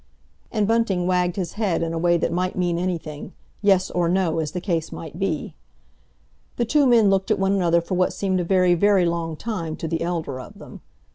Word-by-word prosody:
And 210 -3 0
Bunting 225 -6 +1
wagged 180 -1 +1
his 185 -4 -3
head 200 -6 0
in 165 0 -2
a - - -2
way 175 0 +3
that 165 - -1
might 180 +2 -1
mean 175 -2 0
anything—yes 180 +3 -2
or 175 -1 0
no, 175 -3 +1
as 155 -2 -2
the 180 - -2
case 170 -4 -2
might 160 +1 -8
be. 190 -6 -2 1.0
The 235 - 0
two 285 +4 +3
men 225 -5 +5
looked 190 0 +1
at - - +2
one 195 0 +1
another 170 -3 +2
for 170 - -5
what 185 0 +2
seemed 190 -2 -1
a - - 0
very, 180 0 +3
very 195 +1 +3
long 170 -1 -2
time 170 -5 -4
to 165 - -5
the 165 0 -2
elder 165 -6 -3
of 130 - -11
them. - - -12
180 Hz, 210 wpm, -23 LUFS, 170-195 Hz, 1.0 s, men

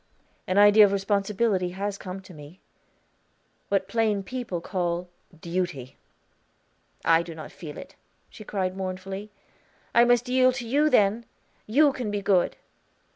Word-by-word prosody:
"An 185 - 0
idea 205 +1 +8
of 200 - +5
responsibility 200 -1 0
has 200 0 -3
come 185 +1 -7
to 190 -1 -14
me 150 +4 -13 1.1
what 195 -1 0
plain 215 -2 0
people 240 -5 -4
call 175 0 -3 0.3
Duty." 170 -7 -4 1.1
"I 165 0 +5
do 170 -1 -8
not 155 - -9
feel 150 -4 -9
it," - - -10 0.3
she 215 - -12
cried 190 -3 -2
mournfully. 190 +2 -5 0.6
"I 235 - +6
must 245 0 +3
yield 255 0 +3
to 245 -3 -5
you 290 +5 +3
then. 220 -2 +2 0.4
You 280 +6 +4
can 245 -5 -4
be 205 -1 -3
good.' 190 -3 +2
195 Hz, 140 wpm, -26 LUFS, 185-225 Hz, 1.1 s, idea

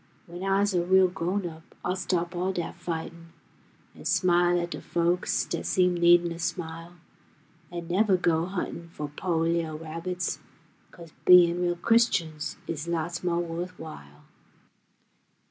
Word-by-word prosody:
W'en 175 +1 -9
ah's 195 +1 +2
a 175 -1 +2
real 190 +1 +5
grown 180 +2 -2
up, 160 -1 -9 0.2
ah'll 180 - 0
stop 180 -2 -1
all 180 +2 0
dat 175 -3 -4
fightin', 170 -1 -6 0.6
An' - - -13
smile 175 -1 +3
at 170 0 -3
de - - -5
folks 175 +1 0
dat - - -4
seem 180 -1 +3
needin' 175 0 +5
a 170 - -6
smile, 170 -1 -4 0.8
An' 170 -1 -6
nevuh 190 +1 +3
go 165 -1 +1
huntin' 175 -2 -5
fo' 150 -3 -6
po' 175 -1 -1
li'l' 165 -1 0
rabbits, 165 +3 -4 0.5
'Cos 170 -3 -13
bein' 175 -1 +7
real 175 -1 +1
Christians 170 -7 +1
is 160 0 -4
lots 170 +1 -2
mo' 175 -1 +1
wuth 175 +1 -4
while. 75 - -11
175 Hz, 145 wpm, -27 LUFS, 165-180 Hz, 0.8 s, bein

